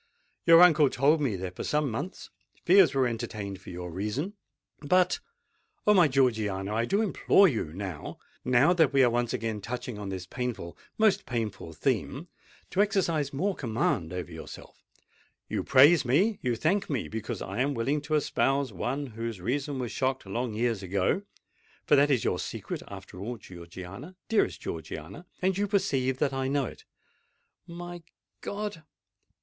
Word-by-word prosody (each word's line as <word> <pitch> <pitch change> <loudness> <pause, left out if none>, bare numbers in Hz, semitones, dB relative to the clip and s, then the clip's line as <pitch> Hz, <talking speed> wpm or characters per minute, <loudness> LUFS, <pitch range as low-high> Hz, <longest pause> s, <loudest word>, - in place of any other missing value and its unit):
Your 165 +1 +9
uncle 155 -5 +6
told 150 +5 +3
me 125 -8 0
that 90 -1 -5
for - - -5
some 150 -3 0
months 175 - -6 0.3
fears 175 -6 +6
were 135 -1 +3
entertained 105 -4 -5
for - - -11
your 90 0 -6
reason: 105 - -3 0.5
but——Oh! 185 - -1
my 180 -5 +6
Georgiana, 110 -7 +1
I 115 +2 +1
do 200 - +1
implore 200 -1 +4
you 125 -10 -1
now—now 100 - -1
that 160 -5 +3
we 135 -1 +5
are 120 - +4
once 120 0 0
again 110 -2 -3
touching 120 0 -5
on 100 -1 -5
this 95 -2 -5
painful—most 125 - -1
painful 110 -8 -3
theme—to 135 - -3
exercise 170 -8 +1
more 190 +9 0
command 110 - -1
over 90 -3 -5
yourself. - - -11 0.6
You - - -2
praise 145 +5 +6
me—you 140 - +1
thank 185 - 0
me, 135 -7 -1
because 110 -1 -5
I 100 +5 -5
am 140 +1 0
willing 135 +6 0
to 155 +1 -1
espouse 135 -3 +1
one 130 +10 -2
whose 115 -3 -5
reason 135 +8 -2
was 125 -3 -3
shocked 130 -2 -1
long 115 +3 -3
years 115 -2 0
ago;—for 100 - -2
that 145 +1 +4
is 130 -5 +2
your - - 0
secret, - - -5
after 95 -2 -10
all, 115 +5 -4
Georgiana—dearest 95 - -4
Georgiana;—and 100 - -4
you 205 - +1
perceive 140 -11 +1
that 135 0 0
I 135 0 -1
know 140 0 +1
it!" - - -10 0.8
"My 175 0 -8 0.4
God! 205 -4 -4
130 Hz, 150 wpm, -28 LUFS, 105-160 Hz, 0.8 s, Your